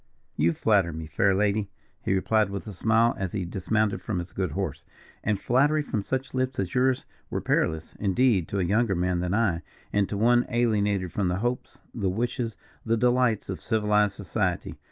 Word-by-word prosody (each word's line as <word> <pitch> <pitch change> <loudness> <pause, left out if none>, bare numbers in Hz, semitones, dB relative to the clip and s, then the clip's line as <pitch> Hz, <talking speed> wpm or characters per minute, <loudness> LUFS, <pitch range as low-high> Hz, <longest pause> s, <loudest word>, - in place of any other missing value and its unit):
"You 85 +3 +2
flatter 100 -2 +2
me, 80 0 -6
fair 95 +5 +2
lady," 105 0 +1 0.3
he 95 - +1
replied, 105 +2 +2
with 100 0 -5
a 105 - -7
smile, 115 +5 +3
as 95 -2 -3
he 95 -4 -2
dismounted 100 +4 0
from 105 - -3
his 85 +1 -5
good 95 -2 -1
horse; 75 -6 -3 0.4
"and 105 -2 0
flattery 145 +7 +2
from 110 -7 -2
such 130 +6 -3
lips 130 0 -1
as 95 -2 -2
yours 130 0 +2 0.2
were - - -2
perillous, 80 0 0
indeed, 100 -2 +2
to 100 - -3
a - - +1
younger 105 +3 +2
man 90 0 0
than 90 +2 -1
I, 100 -7 +1 0.3
and 100 -1 +2
to 100 - -3
one 120 +3 +3
alienated 105 -6 +1
from 100 -3 0
the 90 - 0
hopes, 120 +4 -3
the 100 -5 -1
wishes, 115 +2 -2 0.3
the 115 0 +1
delights 125 -2 +2
of 95 - -5
civilized 105 -2 +2
society. 95 -4 -2
105 Hz, 190 wpm, -26 LUFS, 95-115 Hz, 0.4 s, smile